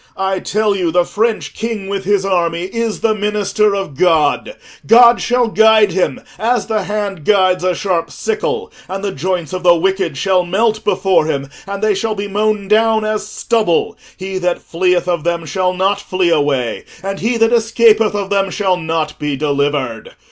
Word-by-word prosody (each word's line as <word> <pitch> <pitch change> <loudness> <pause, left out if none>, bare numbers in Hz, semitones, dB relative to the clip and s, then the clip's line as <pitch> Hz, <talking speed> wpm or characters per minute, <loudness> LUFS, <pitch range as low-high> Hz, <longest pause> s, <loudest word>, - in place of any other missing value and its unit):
I 190 0 -1
tell 210 +2 0
you 180 -3 0
the 175 +1 +2
French 220 +3 -1
king 220 -3 -4
with 195 -1 -4
his 200 -1 +1
army 170 -3 0
is 225 +3 -3
the 225 -1 +2
minister 210 0 0
of 195 -7 -4
God: 160 - +1 0.3
God 235 +1 +6
shall 245 -1 +1
guide 220 -2 +4
him 180 +1 -1 0.2
as 235 0 0
the 215 -3 -2
hand 200 -4 -3
guides 185 -1 +2
a 185 -1 +1
sharp 180 -4 -1
sickle, 450 0 -3 0.2
and 195 +1 -5
the 200 - -1
joints 180 0 -3
of 185 - -3
the 175 -1 +5
wicked 185 -3 -1
shall 185 +3 +2
melt 215 +5 0
before 190 -6 +1
him, 140 -2 -3 0.2
and 200 +1 -5
they 215 -1 +3
shall 215 +2 -2
be 200 0 -4
mown 210 0 -1
down 220 +1 +2
as 215 -1 -2
stubble: 215 -5 0 0.2
he 190 0 -4
that 180 -1 -2
fleeth 180 +1 0
of 170 -3 -1
them 170 -1 -1
shall 185 +3 0
not 195 +2 0
flee 185 -3 0
away, 140 -6 0 0.2
and 195 0 -4
he 230 +3 0
that 225 +1 +3
escapeth 225 -2 +3
of 200 -1 -3
them 195 -1 +1
shall 185 -1 0
not 160 -2 -3
be 150 -1 -2
delivered. 140 -4 -2
195 Hz, 185 wpm, -16 LUFS, 175-215 Hz, 0.3 s, God